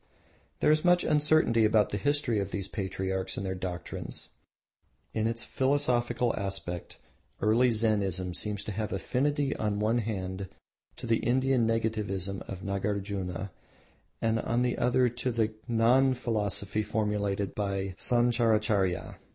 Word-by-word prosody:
There - - +5
is 155 0 +3
much 175 0 +4
uncertainty 150 -6 +3
about 110 -1 +4
the 105 - -1
history 145 -2 +1
of 100 -1 -2
these 100 -1 -3
patriarchs 95 -2 -3
and 100 - -3
their 95 - -1
doctrines. 90 -1 -5 0.8
In 110 0 +1
its 115 +1 -2
philosophical 125 -3 +1
aspect 95 -4 -3 0.4
early 115 +5 +4
Zennism 100 -5 +1
seems 105 -1 -2
to - - -4
have 105 +1 -3
affinity 140 +8 0
on 105 -1 -1
one 110 +3 +2
hand 95 -3 -4 0.5
to - - -8
the 115 0 +3
Indian 130 -1 +2
Negativism 105 -4 -1
of 95 -1 -6
Nagarjuna 100 -2 -3 0.7
and 115 0 +2
on 120 +2 0
the 125 - 0
other 125 +1 +3
to 120 +2 -2
the 115 -2 +1 0.2
Gnan 125 +3 +4
philosophy 105 -3 -1
formulated 105 -2 -1
by 100 -2 -2
Sancharacharya. 110 -6 +1
110 Hz, 135 wpm, -29 LUFS, 100-120 Hz, 0.8 s, There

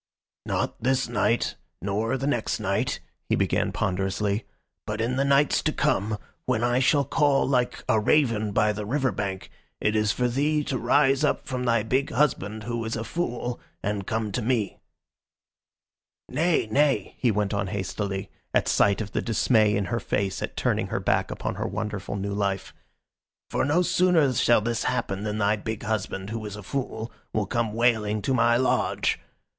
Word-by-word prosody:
"Not - - -2
this 130 +2 +1
night, 120 0 +1 0.2
nor 105 +7 -1
the 135 - -3
next 120 -6 0
night," - - -1 0.3
he - - +3
began - - +1
ponderously, 100 +3 -1 0.4
"but 105 +1 -3
in 120 +3 0
the 135 - +2
nights 140 +1 +3
to - - +1
come, 105 +2 0 0.3
when 125 -3 +1
I 120 +1 +2
shall 140 +2 +3
call 145 0 +2
like 125 -2 0
a 110 - +3
raven 110 -3 +2
by 105 +1 +2
the 105 0 -4
river 130 +4 0
bank, 95 -1 -4 0.3
it 105 - +1
is 105 -1 +3
for 125 - 0
thee 150 +5 +1
to 130 -3 -2
rise 135 +3 +3
up - - +1
from 125 -1 -3
thy 115 -3 +2
big 130 +5 0
husband, 110 -6 0
who 120 0 -3
is 110 0 -3
a 115 - -3
fool, 120 -2 -3 0.2
and 105 -2 -2
come 110 -2 -1
to 125 - -1
me. 110 -4 0 1.5
"Nay, 165 -6 +1
nay," 140 -6 +2
he 125 - +3
went 105 -1 0
on 100 -1 -1
hastily, 95 0 -3 0.2
at - - +3
sight 100 +1 +3
of 105 -2 -5
the - - -1
dismay 110 -2 +3
in 100 0 0
her 115 +5 -1
face 100 -4 -1
at - - -5
turning - - 0
her - - -2
back - - +1
upon - - -3
her - - -3
wonderful 105 -2 -4
new 100 0 -3
life. 100 -1 -2 0.8
"For - - +1
no 155 +6 +3
sooner 175 -7 +3
shall 120 -2 +4
this 115 +1 -1
happen 100 -5 -1
than 105 0 -2
thy 105 0 +2
big 110 +1 -5
husband, 105 -2 -3
who 115 -1 -4
is 105 - -6
a 105 - -9
fool, 115 -1 -4 0.2
will 105 -1 +1
come 115 0 -1
wailing 110 -3 +2
to 135 - +1
my 120 -1 +4
lodge. 130 +1 +1
110 Hz, 180 wpm, -26 LUFS, 105-130 Hz, 1.5 s, shall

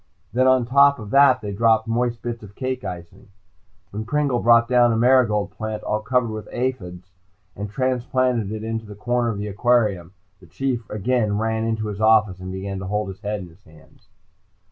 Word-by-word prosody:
Then 130 +2 +3
on 130 -2 +4
top 140 +3 +5
of 105 -4 -9
that 140 -3 +5
they 105 -1 -5
dropped 110 +2 +2
moist 120 0 -1
bits 120 -1 -4
of 105 -2 -13
cake 130 -1 -4
icing. 85 -1 -8 0.6
When 105 +2 -5
Pringle 140 +1 0
brought 115 0 +4
down 120 -1 +4
a 110 - 0
marigold 115 -4 +3
plant, 110 -1 -5
all 105 0 -1
covered 125 0 0
with 110 -1 -7
aphis, 95 -8 -4 0.4
and 100 +1 -5
transplanted 125 -2 0
it 110 0 -5
in 115 0 -3
a 105 - -9
corner 120 +2 -1
of 110 - -3
the 100 - -4
aquarium, 105 -4 0 0.3
the - - -18
Chief 130 -4 -3
again 110 -1 0
ran 110 0 -1
into 110 -1 -2
his 105 0 -5
office 110 -4 +3
and 95 0 -7
began 95 +1 -5
to 95 - -6
hold 105 0 -2
his 95 +1 -10
head 105 -1 -3
in 90 - -10
his 85 +5 -22
hands. 80 -1 -21
110 Hz, 195 wpm, -22 LUFS, 105-125 Hz, 0.6 s, top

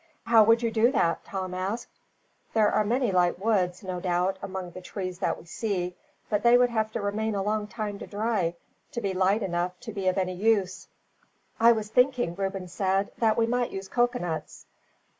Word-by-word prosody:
"How 225 -1 +6
would 230 +2 +4
you 230 - +1
do 225 +2 +3
that?" 170 -8 +1
Tom 185 -2 -4
asked. 195 +6 -4 0.6
"There 215 -2 +4
are 215 - +2
many 240 +1 +1
light 180 -1 +2
woods, 190 -2 0
no 185 -1 -4
doubt, 180 +1 0
among 190 -2 -5
the 185 - -9
trees 185 -1 -5
that 195 - 0
we - - -14
see; 180 -1 -3 0.3
but 210 -2 0
they 240 0 +6
would 245 0 +3
have 220 -1 0
to 230 - -2
remain 210 +2 -1
a 195 - -1
long 210 0 -1
time 210 -2 -5
to - - -8
dry, 205 -5 -1 0.4
to - - -2
be 200 -4 -2
light 190 +3 +2
enough 175 -1 -2
to 225 -3 -7
be 195 -2 -3
of 185 +1 +2
any 185 -1 0
use." 195 -1 0 0.7
"I 230 +1 +7
was 215 -2 -4
thinking," 250 -5 +2
Reuben 195 0 -3
said, 190 +2 0
"that 220 -2 +3
we 230 - +3
might 245 +1 0
use 195 0 -6
coconuts. 240 -10 -1
200 Hz, 195 wpm, -27 LUFS, 185-225 Hz, 0.7 s, I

